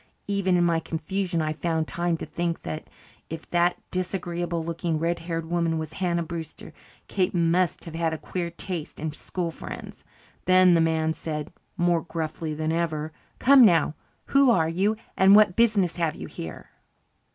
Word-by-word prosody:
Even 195 -3 +1
in 175 - +3
my 170 -1 +2
confusion, 165 +2 -2
I 155 0 -1
found 160 0 -1
time 170 -1 -1
to - - -6
think 170 -1 -3
that 155 - -5 0.4
if 160 0 -7
that 175 0 +3
disagreeable 175 -2 -2
looking 165 -1 -2
red 170 +2 0
haired 165 -1 -4
woman 170 -2 +1
was 160 -1 -5
Hannah 170 -2 0
Brewster, 165 -1 -7 0.3
Kate 185 -2 0
must 170 +1 +2
have 165 - -8
had 165 0 0
a 160 - -3
queer 175 +2 -4
taste 170 -2 -6
in 155 0 -2
school 170 +2 -4
friends. - - -9 0.4
Then 185 0 +6
the 165 - +4
man 160 -1 +1
said, 155 -1 -5 0.2
more 175 -1 +2
gruffly 160 -1 -4
than 155 +1 -1
ever, 160 -2 -1 0.3
"Come 270 0 +7
now. 170 -7 +5 0.4
Who 275 -1 +6
are 165 -9 +4
you 195 +6 +1 0.2
and 195 +1 +7
what 210 -4 +6
business 210 -7 +3
have 165 -3 0
you - - -7
here?" 80 -1 -8
170 Hz, 170 wpm, -26 LUFS, 160-180 Hz, 0.4 s, Come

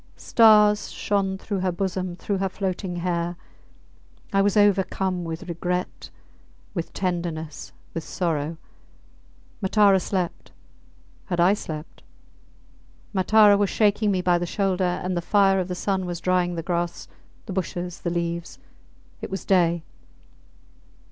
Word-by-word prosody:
Stars 210 -2 +5
shone 195 -2 -1
through 200 0 -4
her 185 0 0
bosom, 185 0 -3
through 195 +2 -3
her 195 0 0
floating 185 -1 -3
hair. 175 0 -2 1.0
I 195 - +4
was 205 +1 +2
overcome 190 -2 +2
with 165 +1 -6
regret, 180 +1 -3 0.6
with 170 -3 -4
tenderness, 170 -4 -3 0.2
with 165 - -4
sorrow. 160 -2 -2 1.0
Matara 200 0 +4
slept... 180 -2 -3 0.7
Had 175 -3 -3
I 180 +3 +5
slept? 155 -6 -7 1.1
Matara 205 +1 +5
was 205 -2 +2
shaking 210 0 +2
me 185 -2 0
by 175 -1 +3
the 175 - -3
shoulder, 190 -1 0 0.2
and 180 0 -1
the 175 - -1
fire 195 +1 +3
of 180 - -2
the 180 - -4
sun 190 0 -1
was 175 -1 -4
drying 180 -1 +1
the 165 - -4
grass, 175 0 -2 0.4
the 195 - -6
bushes, 180 -1 -4
the 175 - -1
leaves. 170 0 -3 0.6
It - - -5
was 195 0 -5
day. 170 -3 +2
185 Hz, 135 wpm, -24 LUFS, 175-195 Hz, 1.1 s, Stars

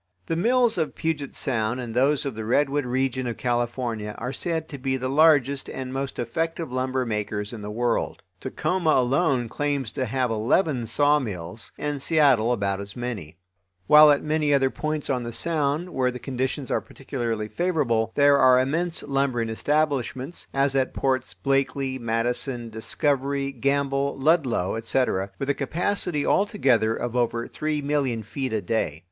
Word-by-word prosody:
The 165 - -1
mills 235 +3 +2
of 160 - -1
Puget 150 -4 -3
sound 120 -2 0
and 120 -3 -5
those 135 +4 +2
of 135 - -2
the 110 0 -6
redwood 140 +4 +1
region 130 0 -1
of 120 - -4
California 120 -3 -2
are 125 +3 -4
said 160 -1 -2
to 140 - -7
be 130 0 -1
the 130 0 -3
largest 140 -1 +3
and 130 -1 -5
most 135 0 -3
effective 165 +5 -2
lumber 130 0 -1
makers 105 -1 -3
in 110 - -7
the 105 - -6
world. 120 +2 -1 0.2
Tacoma 180 -3 -1
alone 130 0 +2
claims 140 -2 -2
to 130 - -2
have 125 +1 0
eleven 120 - +1
sawmills, 115 - 0
and 145 -2 -3
Seattle 140 -7 +4
about 100 -4 0
as 100 0 -8
many; 105 -11 -5 0.5
while 150 +7 +8
at 145 -1 +3
many 155 -1 +1
other 135 -2 +3
points 155 -1 -3
on 125 -2 0
the 120 0 -5
Sound, 155 +4 -1
where 130 -1 +1
the 125 - -5
conditions 130 +1 -3
are - - +1
particularly 120 -5 -4
favorable, 125 - 0
there 140 0 +5
are 130 -1 +6
immense 165 +6 -1
lumbering 135 -5 0
establishments, 140 +2 -1
as 135 0 +1
at 130 -1 0
Ports 130 -1 -1
Blakely, 135 -1 0
Madison, 120 +1 -2
Discovery, 140 +4 -1
Gamble, 140 +1 0
Ludlow, 135 - +1
etc., 115 -4 0
with 135 +1 0
a - - 0
capacity 165 +2 -1
all 200 - +3
together 120 - +2
of 120 0 -4
over 120 -1 0
three 150 -1 -2
million 140 -6 0
feet 130 +4 -4
a 110 -2 -1
day. 80 -9 -1
130 Hz, 165 wpm, -25 LUFS, 120-145 Hz, 0.5 s, while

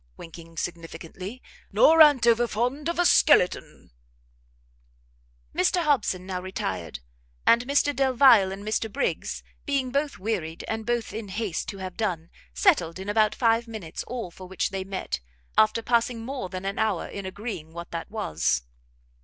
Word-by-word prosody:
winking 165 0 -12
significantly, 170 +7 -6 0.3
"nor 325 -9 +6
a'n't 290 -6 +7
over 235 0 +4
fond 250 +8 -1
of 340 - -2
a 350 - +3
skeleton!" 180 - +3 1.6
Mr 345 - +2
Hobson 230 - +1
now 185 -1 -4
retired; 95 - -4 0.4
and 240 +2 +4
Mr 285 0 +2
Delvile 255 -7 +5
and 195 +1 -7
Mr 215 0 -1
Briggs, 280 - -2 0.2
being 275 -3 -1
both 280 +1 -1
wearied 185 -6 -3
and 220 0 -4
both 240 -1 -1
in 220 -1 -5
haste 195 -3 -3
to 200 - -6
have 185 -1 -7
done, 175 -7 -2 0.2
settled 190 - +2
in 190 +2 -6
about 215 0 +2
five 230 -1 +2
minutes 215 -8 -6
all 235 -7 -5
for 185 +2 -11
which 190 0 -2
they 195 -1 -3
met, 190 - -4 0.4
after 220 +1 +3
passing 235 -1 0
more 255 -7 -4
than 185 +1 -6
an 195 0 -3
hour 215 -5 0
in 200 -2 -6
agreeing 190 -5 -6
what 170 +1 -8
that 165 +3 -5
was. 80 - -1
215 Hz, 155 wpm, -26 LUFS, 185-245 Hz, 1.6 s, a'n't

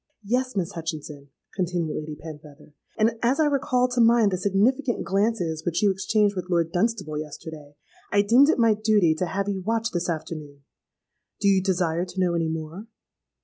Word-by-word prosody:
—'Yes, 255 +4 -1
Miss 180 -4 -1
Hutchinson,' 155 -3 -6 0.3
continued 175 -5 -2
Lady 155 0 -5
Penfeather; 150 -1 -12 0.2
'and 225 +1 +1
as 250 +5 +1
I 310 - +4
recalled 255 -3 +1
to 245 -1 +2
mind 230 -2 +5
the 185 - -1
significant 235 +7 +1
glances 195 -5 0
which 175 +5 -1
you 205 - +5
exchanged 205 +1 +1
with 180 -1 -5
Lord 170 -2 +1
Dunstable 185 -6 -1
yesterday, 150 -1 -9 0.4
I 205 0 +4
deemed 245 +8 +5
it - - +3
my 230 -2 +4
duty 210 -6 +3
to 175 +3 -2
have 195 +2 -2
you 195 -2 -2
watched 225 +3 -1
this 175 0 -2
afternoon. 155 -3 -6 0.8
Do 200 - +1
you 195 -1 +4
desire 180 -2 0
to 185 +1 -8
know 180 -2 +2
any 165 -1 0
more?' 160 +6 -6
190 Hz, 180 wpm, -25 LUFS, 160-220 Hz, 0.8 s, mind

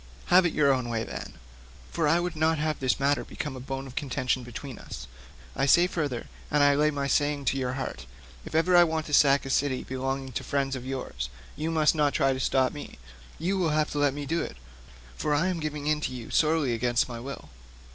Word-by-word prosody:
Have 180 0 +7
it - - -4
your 140 -2 +4
own 125 -2 -2
way 115 -1 -1
then; - - -7 0.6
for 165 -3 +1
I 165 +3 +4
would 175 -1 -2
not 160 +1 +2
have 155 0 -1
this 130 -1 +1
matter 140 +1 +2
become 150 -6 -5
a - - -7
bone 135 +1 -5
of 130 - -10
contention 130 -3 -1
between 120 +1 -8
us. - - -8 0.5
I 135 - +1
say 175 +5 +6
further, 150 -9 -2 0.2
and 145 -1 +4
lay 150 0 +4
my 140 -2 -2
saying 145 0 +1
to 135 - +1
your 125 -1 -1
heart, 95 - -5 0.4
if - - -8
ever 175 +3 +4
I 175 - +9
want 160 -2 -1
to 150 - -7
sack 140 -1 +5
a 135 - -3
city 135 -1 +1
belonging 135 0 -3
to - - -4
friends 135 -1 -1
of 130 0 -7
yours, 95 - -4 0.3
you 155 +2 -2
must 155 -2 +3
not 150 -3 +1
try 135 0 +3
to 130 - -4
stop 130 0 +2
me; 145 - -9 0.4
you 190 +4 -1
will 170 -3 +2
have 155 0 +1
to 145 - -2
let 145 -1 +2
me 145 0 -4
do 165 +4 0
it, 65 - -6 0.6
for 145 - 0
I 170 +6 +2
am 180 -2 -2
giving 150 -2 -4
in 150 0 +1
to - - -2
you 120 -2 -8
sorely 155 -5 +2
against 120 +1 +1
my 120 -2 -6
will. 135 +3 -8
140 Hz, 230 wpm, -27 LUFS, 130-155 Hz, 0.6 s, I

